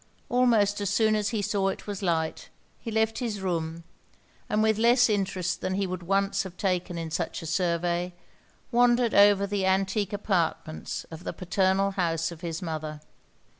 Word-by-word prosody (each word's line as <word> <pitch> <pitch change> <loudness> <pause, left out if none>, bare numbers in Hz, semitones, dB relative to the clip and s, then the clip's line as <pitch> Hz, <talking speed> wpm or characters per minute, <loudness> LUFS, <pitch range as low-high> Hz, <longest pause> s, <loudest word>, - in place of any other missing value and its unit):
Almost 225 -5 +3
as 200 - 0
soon 215 +1 +3
as 210 -1 0
he 215 -2 -2
saw 200 -1 0
it 195 - -3
was 205 -1 -5
light, 165 -4 -1 0.3
he 230 - -6
left 220 0 +1
his 225 -5 -3
room, 165 -3 -3 0.7
and 215 +1 +2
with 220 -1 +2
less 240 +1 +5
interest 185 -3 -1
than 185 - -1
he 195 0 0
would 185 -1 -4
once 195 +2 +1
have 190 -3 -8
taken 180 -2 -1
in 165 -1 -5
such 170 0 -3
a - - -6
survey, 175 +1 0 0.6
wandered 240 -1 +3
over 200 -1 +6
the 200 -1 -2
antique 195 +2 +1
apartments 180 -6 -2
of 160 +2 -9
the - - -4
paternal 190 +2 +1
house 165 -3 -1
of 170 -1 -10
his 165 0 -4
mother. 155 -2 -4
195 Hz, 170 wpm, -27 LUFS, 175-210 Hz, 0.7 s, over